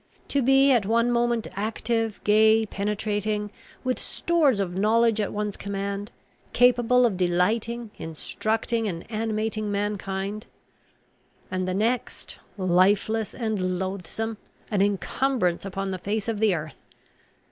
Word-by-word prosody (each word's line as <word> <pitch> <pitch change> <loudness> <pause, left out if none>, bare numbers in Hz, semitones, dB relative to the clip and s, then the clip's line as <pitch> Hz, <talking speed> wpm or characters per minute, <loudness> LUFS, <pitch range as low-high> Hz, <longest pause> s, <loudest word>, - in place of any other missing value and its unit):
To 280 - +2
be 270 +2 +5
at 240 -5 +4
one 235 +2 +3
moment 235 -1 +1
active, 225 +1 -1
gay, 220 +1 +5
penetrating, 210 0 -2 0.3
with 255 -1 -1
stores 305 -10 +1
of 180 -3 -2
knowledge 220 +2 +3
at 205 - -2
one's 210 -1 -2
command, 200 +1 -4 0.4
capable 245 0 +4
of 210 -6 +1
delighting, 215 +6 0
instructing, 220 +7 -2
and 170 -4 -4
animating 215 -1 -2
mankind, 200 0 -3 1.0
and 185 0 -1
the 185 - -1
next, 230 +4 -2 0.2
lifeless 195 +4 +2
and 200 -6 -1
loathsome, 195 +4 -4 0.3
an 200 -2 +2
incumbrance 200 -1 0
upon 195 0 -3
the 185 - -4
face 205 +3 -2
of 225 -3 -1
the 210 -4 +3
earth! 155 -2 -7
210 Hz, 125 wpm, -25 LUFS, 195-230 Hz, 1.0 s, be